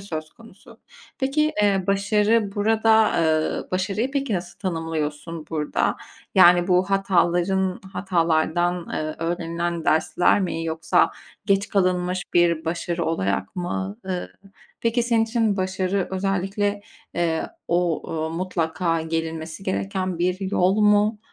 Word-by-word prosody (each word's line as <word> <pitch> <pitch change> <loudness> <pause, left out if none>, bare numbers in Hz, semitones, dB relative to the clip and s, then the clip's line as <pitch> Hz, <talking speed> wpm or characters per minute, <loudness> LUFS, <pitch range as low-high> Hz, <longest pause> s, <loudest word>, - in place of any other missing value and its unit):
söz 155 -5 -6
konusu. 225 -4 -17 0.4
Peki, 300 +3 +1
eee, 195 -2 +2
başarı 205 +1 +2
burada, 220 +1 +3
eee, 155 -1 0
başarıyı 195 +7 -1
peki 275 -5 -1
nasıl 175 0 -5
tanımlıyorsun 165 -3 -3
burada? 150 -2 0 0.4
Yani 175 -1 +6
bu 185 +1 +2
hataların 190 -1 +1
hatalardan, 175 -1 0
eee, 155 0 -3
öğrenilen 170 0 -2
dersler 160 +5 +3
mi 165 -3 -2
yoksa 165 +1 +2 0.4
geç 200 0 +2
kalınmış 180 -2 +1
bir 170 -2 +3
başarı 170 +1 -2
olarak 100 - -1
mı? 95 - -3
Iıı, 185 -2 -3 0.5
peki, 230 +1 +1
senin 230 -1 +2
için 225 -3 0
başarı 185 0 -1
özellikle, 195 +2 -1 0.3
eee, 165 -2 0 0.2
o, 170 -2 +1
ııı, 160 0 -2
mutlaka 165 -1 -1
gelinmesi 160 +1 -4
gereken 190 -2 -2
bir 185 +2 -1
yol 190 +2 +2
mu? 210 +1 +4
180 Hz, 120 wpm, -23 LUFS, 165-200 Hz, 0.5 s, Yani